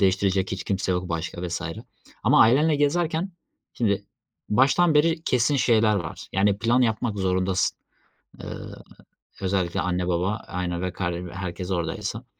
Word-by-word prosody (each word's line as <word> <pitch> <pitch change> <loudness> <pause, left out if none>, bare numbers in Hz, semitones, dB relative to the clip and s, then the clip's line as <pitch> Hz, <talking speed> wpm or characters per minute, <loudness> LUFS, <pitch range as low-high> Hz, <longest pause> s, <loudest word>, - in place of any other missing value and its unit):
değiştirecek 95 0 +2
hiç 95 - -4
kimse 95 -1 -1
yok 90 0 -2
başka 85 +1 -3
vs. 85 - -3 0.6
ama - - +5
ailenle 145 +7 +5
gezerken 160 +5 0 0.4
şimdi 100 -3 0 0.4
baştan 140 +9 +4
beri 160 +2 +3
kesin 125 +2 +2
şeyler 110 -4 +3
var, 85 -4 -6
yani, 100 +1 +2
plan 115 +4 +2
yapmak 110 -2 0
zorundasın, 95 0 +1 0.7
ııı, - - -8 0.6
özellikle 95 -2 0
anne 90 0 -1
baba, 90 +4 0
aynen, 90 -1 -3
ve 90 -1 -2
kard 85 -1 -3
herkes 90 0 -5
oradaysa 85 -3 -3
95 Hz, 135 wpm, -25 LUFS, 90-125 Hz, 0.7 s, ama